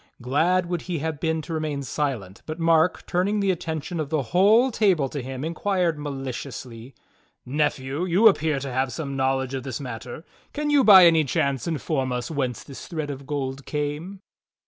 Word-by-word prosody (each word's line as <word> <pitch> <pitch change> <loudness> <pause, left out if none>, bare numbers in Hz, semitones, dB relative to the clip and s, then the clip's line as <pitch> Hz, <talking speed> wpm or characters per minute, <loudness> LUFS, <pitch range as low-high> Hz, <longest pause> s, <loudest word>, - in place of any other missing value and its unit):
Glad 160 +9 +1
would 175 -1 -3
he 175 - -1
have 160 0 -3
been 160 -1 -1
to 165 - -6
remain 155 -3 -2
silent, 125 -10 -3
but 155 0 -4
Mark, 165 0 +2
turning 195 +4 0
the 200 -1 +2
attention 165 -1 -4
of 150 -3 -3
the 155 -3 0
whole 220 +8 +5
table 190 - +2
to 145 - -4
him, 130 +2 -5
inquired 170 -1 0
maliciously: 130 -3 -6 0.5
"Nephew, 145 +2 -1
you 185 +5 +5
appear 160 -7 +3
to 135 -2 -5
have 130 0 0
some 140 -3 -5
knowledge 130 0 0
of 135 - -2
this 130 -2 -5
matter. 125 +2 -7 0.3
Can 295 0 -1
you 285 -2 +5
by 190 -5 +9
any 165 -2 +5
chance 140 -1 -1
inform 145 -4 -1
us 125 +3 -3
whence 130 -6 -2
this 135 - -10
thread 155 -4 -4
of 135 -1 -9
gold 140 -2 -4
came. 150 +6 -4
150 Hz, 180 wpm, -24 LUFS, 135-170 Hz, 0.5 s, by